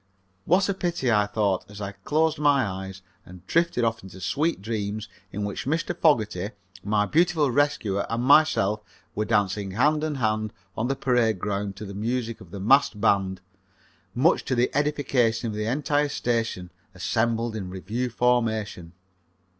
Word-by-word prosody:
"What 185 +4 +3
a 200 - +1
pity!" 175 -9 -1
I 105 -2 +3
thought 105 -3 -1
as 105 0 -10
I 100 -1 -4
closed 155 +6 0
my 145 -4 +4
eyes 95 -1 -6 0.2
and 90 0 -14
drifted 170 - +1
off 115 -1 0
into 95 0 -11
sweet 155 - 0
dreams 105 0 -3 0.2
in 105 - -4
which 100 +5 -5
Mr. 165 +4 -1
Fogerty, 105 - +2 0.3
my 105 0 +1
beautiful 160 0 +2
rescuer, 120 -8 +1
and 115 +1 -1
myself 130 -8 +4 0.3
were 105 - -1
dancing 105 -2 0
hand 150 +7 +2
and 155 -2 -2
hand 110 -3 -1 0.2
on 115 - -1
the 135 - 0
parade 120 -6 +2
ground 100 +1 -3
to 105 - -8
the 100 - -7
music 115 +2 -3
of 95 - -13
the 100 +2 -7
massed 115 +1 +3
band, 95 -3 +1 0.7
much 150 +9 +3
to 130 - 0
the 120 +1 +2
edification 130 -6 +1
of - - -4
the 105 0 -2
entire 145 +3 +1
station 115 -9 -2 0.2
assembled 115 0 0
in 95 -4 -5
review 105 +7 -3
formation. 110 -8 0
115 Hz, 160 wpm, -25 LUFS, 100-140 Hz, 0.7 s, my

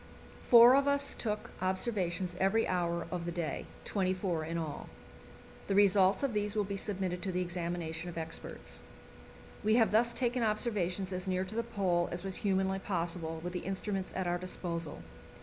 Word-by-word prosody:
Four 240 +1 +8
of 280 +1 +3
us 280 0 +2
took 210 -2 -3
observations 185 -2 0
every 195 +4 +3
hour 170 -2 0
of 175 -2 -3
the 175 - -2
day 165 -4 -3 0.2
twenty 190 -2 0
four 180 -4 -1
in 165 +2 -3
all. 160 -3 -5 0.8
The 195 - 0
results 195 +1 +5
of 275 -4 0
these 210 0 -1
will 210 - +2
be 200 0 -4
submitted 190 -3 -2
to 190 - -2
the 180 0 -1
examination 175 -1 -3
of 170 - -8
experts. 165 0 -6 0.8
We 215 +1 +4
have 230 -2 +4
thus 235 +3 +4
taken 245 0 0
observations 205 -4 +1
as 185 +1 -3
near 185 0 0
to 190 - -7
the 230 - +1
Pole 190 -7 0
as 175 +1 -4
was 190 -1 -3
humanly 190 -1 +1
possible 170 -4 -2
with 175 0 -4
the 180 - -2
instruments 195 +1 -3
at 190 - -1
our 175 0 0
disposal. 170 - -4
185 Hz, 180 wpm, -32 LUFS, 175-210 Hz, 0.8 s, Four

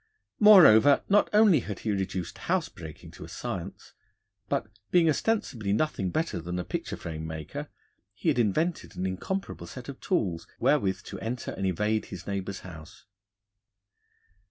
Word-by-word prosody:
Moreover, 150 - +8
not 205 +1 +4
only 210 -7 +6
had 105 -4 -6
he 110 - -1
reduced 95 -3 -3
house - - +1
breaking 75 -2 -11
to - - -11
a - - -9
science, - - -6 0.6
but, - - 0 0.2
being 175 -2 +4
ostensibly 145 - 0
nothing 105 -6 0
better 160 - -2
than 90 +2 -4
a 90 - -2
picture - - -4
frame 80 -1 -6
maker, 80 -1 -6 0.5
he - - 0
had - - +2
invented 155 - 0
an 90 - -3
incomparable 140 - -4
set 125 -1 -9
of 135 - -8
tools 95 - -1
wherewith 100 -9 +2
to - - -8
enter 115 +1 -4
and 95 - -2
evade 105 +4 0
his 95 -4 -9
neighbour's 100 0 -4
house. 80 -3 -12
105 Hz, 155 wpm, -28 LUFS, -, 0.6 s, Moreover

